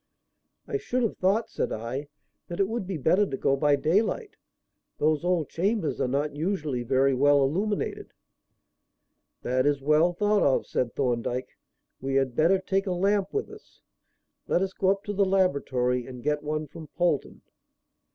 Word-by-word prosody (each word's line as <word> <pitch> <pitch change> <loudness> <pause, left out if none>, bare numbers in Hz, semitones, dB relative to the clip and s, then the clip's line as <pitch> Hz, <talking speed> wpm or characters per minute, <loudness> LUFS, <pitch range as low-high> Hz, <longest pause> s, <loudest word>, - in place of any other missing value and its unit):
"I 430 - -1
should 255 -11 -2
have 225 - -1
thought," 200 +5 +2
said - - -2
I, 120 +6 -4 0.4
"that 175 - -6
it 195 - +3
would 225 -3 -3
be 190 -3 -3
better 165 +8 +3
to 135 - -4
go 135 - +2
by 145 +1 +3
daylight. 210 - 0 0.6
Those 155 +1 +1
old 175 -4 0
chambers 195 -1 -1
are - - +1
not 145 +3 -1
usually 155 -6 -2
very 135 +3 +2
well 140 +2 +4
illuminated." 195 +10 -2 1.3
"That 130 +2 +1
is 145 -1 +2
well 155 +4 +4
thought 205 +3 +2
of," 135 - +2
said 120 -2 -2
Thorndyke. 125 -1 -2 0.5
"We 135 +1 -2
had 135 -3 +1
better 165 +7 +4
take 195 +1 -1
a 185 - 0
lamp 195 +2 +1
with 420 - -3
us. - - -16 0.6
Let 180 - +2
us 190 0 -3
go 190 - +1
up 195 +1 +1
to 205 - -4
the 200 0 +2
laboratory 140 -10 +1
and 125 -2 -9
get 150 +1 0
one 155 +1 -2
from 155 +2 -11
Polton." 170 -1 -1
155 Hz, 170 wpm, -27 LUFS, 135-195 Hz, 1.3 s, well